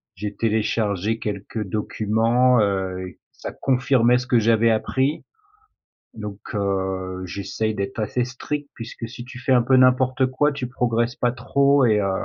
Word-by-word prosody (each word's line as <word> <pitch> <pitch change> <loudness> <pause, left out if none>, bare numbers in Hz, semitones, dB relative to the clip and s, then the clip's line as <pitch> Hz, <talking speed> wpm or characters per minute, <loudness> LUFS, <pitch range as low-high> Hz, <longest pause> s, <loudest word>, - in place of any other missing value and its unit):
j'ai 105 +1 -5
téléchargé 110 -1 0
quelques 105 +1 -4
documents, 115 +5 +2
heu, 95 -2 -2 0.2
ça - - -7
confirmait 125 -2 +2
ce 125 - -6
que 120 - +4
j'avais 115 +1 +3
appris, 130 +6 0 0.9
donc 105 -2 -7 0.2
heu, 95 -2 -2
j'essaie 100 +4 -3
d'être 100 +5 -4
assez 120 +3 -1
strict 140 +3 -5
puisque 115 0 -7
si 120 +1 -9
tu 125 0 -10
fais 130 +1 +1
un 125 - +5
peu 130 +2 +3
n'importe 130 0 +4
quoi, 140 +3 +1
tu 130 -3 -4
progresses 120 -1 -1
pas 120 - +1
trop 140 +2 +2
et 110 -3 +3
heu 100 -1 0
115 Hz, 150 wpm, -22 LUFS, 105-125 Hz, 0.9 s, un